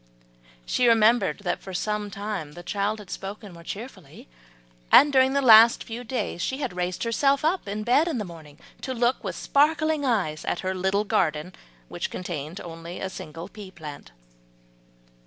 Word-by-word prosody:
She 245 - +2
remembered 230 -1 +4
that 175 -2 -2
for 190 -1 -8
some 210 +2 -2
time 200 -7 -5
the 175 +2 -10
child 205 +3 -1
had 210 -3 -11
spoken 200 0 -7
more 170 0 -13
cheerfully, 205 0 -9 0.6
and 290 0 +7
during 260 0 +4
the 280 0 +1
last 230 -1 +8
few 235 +2 -7
days 225 -7 -3
had 265 -6 -4
raised 180 0 -2
herself 275 +5 +2 0.2
in 210 +2 -3
bed 265 +8 +3
in 320 - -1
the 210 - -3
morning 160 -4 -12 0.2
to 260 - -4
look 240 +2 +1
with - - -4
sparkling 310 +1 +2
eyes 195 - 0
at - - -2
her 185 0 -2
little 190 +2 0
garden 180 -5 0 0.3
which - - -4
contained 170 -1 -5
only 165 +1 -8
a 190 - -4
single 165 0 -8
pea 210 -3 -11
plant. 155 - -10
205 Hz, 165 wpm, -25 LUFS, 175-240 Hz, 0.6 s, last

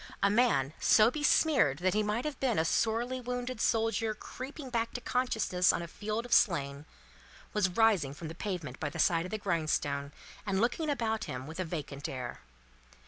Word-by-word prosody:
A 200 - +4
man, 205 - +2
so 220 +2 +5
besmeared 295 - +3
that 185 +3 +1
he 215 - +2
might 215 +5 -1
have 300 -3 -4
been 255 -4 +1
a 160 - +2
sorely 235 +7 0
wounded 245 -1 -4
soldier 225 -1 +1
creeping 265 +4 -8
back 230 -1 -1
to - - -2
consciousness 220 -9 +1
on - - -2
a - - -6
field 215 +6 -4
of 245 - -2
slain, 140 -6 +2 0.7
was 210 -3 +2
rising 185 -8 +2
from 160 +3 -7
the 160 - -6
pavement 165 -8 -5
by 150 - -2
the - - -8
side 165 -1 +2
of - - -6
the 215 - -1
grindstone, 155 -7 -1 0.3
and 195 -2 -1
looking 250 +8 0
about 225 -5 -1
him 130 +1 -5
with 160 +4 -8
a 185 - -1
vacant 150 -4 -5
air. 125 -2 -5
210 Hz, 190 wpm, -31 LUFS, 160-235 Hz, 0.7 s, so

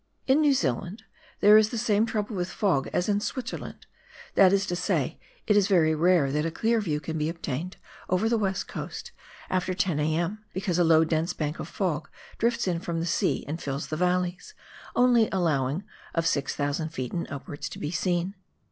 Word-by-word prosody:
In 270 +3 +4
New 290 -2 +4
Zealand 175 - -2 0.4
there 210 +1 +8
is 215 0 +4
the 235 - -4
same 220 -1 +2
trouble 215 -1 -2
with 175 -1 -2
fog 180 -8 0
as 180 - 0
in 205 -1 +2
Switzerland, 255 +3 -5 0.5
that 190 -2 +6
is 200 0 +2
to 175 - -2
say, 175 - -1 0.3
it 210 - +3
is 205 -2 +4
very 165 -6 +4
rare 160 -3 +3
that 150 +2 0
a 165 - 0
clear 225 +7 +1
view 155 -7 -1
can 160 +1 -4
be 155 +1 0
obtained 165 +1 -4 0.3
over 185 +4 +2
the 230 - +2
west 195 -2 -1
coast - - -6 0.4
after 185 0 -1
10 180 -6 0
a.m. 170 +7 -1
because 185 -2 -1
a - - +5
low 160 -1 +5
dense 160 +1 0
bank 150 0 -3
of - - -5
fog 165 -6 -2 0.3
drifts 235 -1 +1
in 175 -2 0
from 170 -1 -3
the 165 - -1
sea 170 - 0
and 160 +4 -4
fills 140 +1 -4
the 155 - -2
valleys, 180 - -1 0.4
only 245 -3 +4
allowing 155 -3 0 0.3
of 165 -1 +1
6,000 145 +1 -1
ft. 130 -6 -5
and 170 - -3
upwards 140 +1 -6
to - - -9
be 150 - -4
seen. 175 +2 0
180 Hz, 195 wpm, -27 LUFS, 155-205 Hz, 0.5 s, there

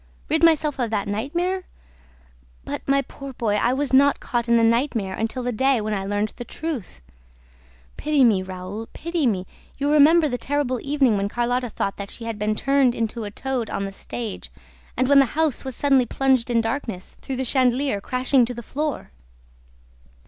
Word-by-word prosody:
Rid 315 +1 +1
myself 305 -4 +3
of 240 -3 0
that 210 -2 -1
nightmare? 345 - -2 1.0
But, - - -4
my 275 0 +3
poor 275 -1 -9
boy, 225 -4 -1
I 235 +3 +2
was 275 0 -2
not 280 +1 +5
caught 240 -1 -2
in 235 - +5
the 230 - +3
nightmare 230 -4 +1
until 225 +5 -3
the 245 - -1
day 265 +2 +2
when 215 0 -2
I 195 -1 -2
learned 205 +1 0
the 240 - -5
truth!... 250 - -6 1.0
Pity 300 -3 +2
me, 215 -6 +4
Raoul, 185 +4 -7
pity 335 -4 -1
me!... 190 -5 0 0.3
You 285 +1 0
remember 305 +2 +6
the 250 -3 -3
terrible 265 -1 -1
evening 275 -6 +2
when 200 0 -1
Carlotta 245 +2 -1
thought 195 -2 -3
that 200 0 -6
she 235 - -7
had 225 -2 -4
been 210 +1 0
turned 275 0 +2
into 225 0 -3
a - - -4
toad 250 +1 -3
on 200 - -2
the 195 - -5
stage 220 +2 -6 0.5
and 255 - +2
when 280 0 +6
the 275 - +6
house 315 -5 +1
was 265 -2 -5
suddenly 270 -4 +3
plunged 265 -2 +1
in 235 -1 +3
darkness 225 -5 -4
through 270 - -4
the 260 +1 -2
chandelier 255 -3 +1
crashing 255 +3 +2
to 245 +1 -6
the 235 - -7
floor? 290 - -4
250 Hz, 190 wpm, -23 LUFS, 220-275 Hz, 1.0 s, remember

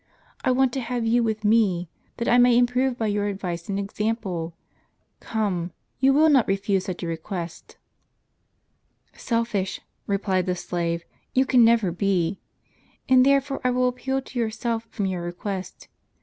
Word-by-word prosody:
I - - +2
want 255 0 +3
to 270 - -1
have 240 -1 -2
you 235 +2 +3
with 220 -2 -1
me, 205 -5 +3 0.3
that 235 - -2
I 245 - +5
may 245 -1 +6
improve 245 +1 +2
by 225 - -1
your 205 -1 0
advice 180 -4 -4
and 195 - -1
example. 200 -5 -3 0.6
Come, 185 -6 -2 0.3
you 265 +1 +5
will 305 +3 +5
not 275 -6 +4
refuse 195 -1 0
such 185 -1 -5
a - - -2
request." 165 +1 -6 0.7
" - - -45
Selfish," 230 -5 -1 0.3
replied 190 -2 0
the 180 - +1
slave, 170 -1 -2 0.2
" - - -44
you 260 +1 +4
can 250 -2 +5
never 225 -5 +4
be. 185 -1 0 0.7
And 255 -1 +6
therefore 275 0 +2
I 250 - +3
will 250 0 +2
appeal 265 +2 -2
to 255 - -6
yourself 230 0 -2
from 200 - -3
your 185 -2 -2
request. 185 +2 -6
215 Hz, 165 wpm, -24 LUFS, 185-245 Hz, 0.7 s, may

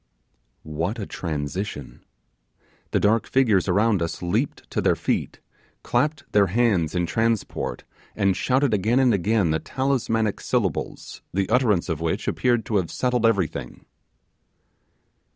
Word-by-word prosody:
What 80 +8 -3
a 105 - -4
transition! 75 -1 -5 0.9
The - - +1
dark 110 +2 +2
figures 115 -9 +2
around 100 +1 +2
us 85 +2 -3
leaped 85 - -1
to - - 0
their - - +3
feet, - - -2 0.4
clapped 150 -1 0
their 100 -1 +4
hands 95 -6 +1
in 90 -1 +1
transport, 115 +5 -1 0.3
and 100 -3 +2
shouted 130 +2 +1
again 110 +5 +2
and 130 -3 +4
again 100 -2 +1
the 80 - +1
talismanic 115 - -1
syllables, - - -2
the 95 -1 +1
utterance 110 -7 +2
of 80 -3 -3
which 80 -1 -2
appeared 120 -3 +1
to 105 - 0
have 90 -4 -1
settled 125 -2 +1
everything. 100 -8 -2
105 Hz, 135 wpm, -24 LUFS, 90-115 Hz, 0.9 s, their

